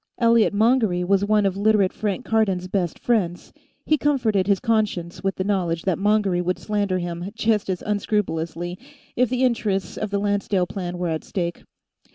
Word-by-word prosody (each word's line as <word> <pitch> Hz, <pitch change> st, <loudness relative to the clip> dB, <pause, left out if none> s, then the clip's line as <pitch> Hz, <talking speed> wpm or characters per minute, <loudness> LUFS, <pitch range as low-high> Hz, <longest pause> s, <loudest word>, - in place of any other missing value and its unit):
Elliot 230 Hz, -2 st, +4 dB
Mongery 215 Hz, -4 st, +2 dB
was 195 Hz, +2 st, +2 dB
one 210 Hz, 0 st, +2 dB
of 190 Hz, -1 st, +1 dB
Literate 205 Hz, -1 st, +2 dB
Frank 205 Hz, -4 st, -3 dB
Cardon's 195 Hz, -5 st, +1 dB
best 180 Hz, -3 st, -1 dB
friends; 185 Hz, -8 st, -1 dB, 0.3 s
he 310 Hz, -1 st, +2 dB
comforted 225 Hz, -10 st, +1 dB
his 200 Hz, -2 st, +3 dB
conscience 210 Hz, -7 st, -1 dB
with 195 Hz, 0 st, 0 dB
the 185 Hz, -, -2 dB
knowledge 180 Hz, -5 st, -1 dB
that 185 Hz, -3 st, 0 dB
Mongery 205 Hz, -3 st, +2 dB
would 180 Hz, +1 st, -1 dB
slander 205 Hz, -3 st, -1 dB
him 175 Hz, +1 st, -4 dB
just 220 Hz, -3 st, +1 dB
as 185 Hz, -1 st, -2 dB
unscrupulously, 180 Hz, -4 st, -2 dB, 0.4 s
if 250 Hz, -1 st, +2 dB
the 255 Hz, +1 st, 0 dB
interests 215 Hz, -6 st, 0 dB
of 215 Hz, -, -2 dB
the 200 Hz, -, -1 dB
Lancedale 200 Hz, -2 st, 0 dB
Plan 180 Hz, -1 st, -5 dB
were 175 Hz, -1 st, -2 dB
at 160 Hz, -1 st, -2 dB
stake. 170 Hz, -2 st, -4 dB
200 Hz, 175 wpm, -23 LUFS, 180-215 Hz, 0.4 s, Elliot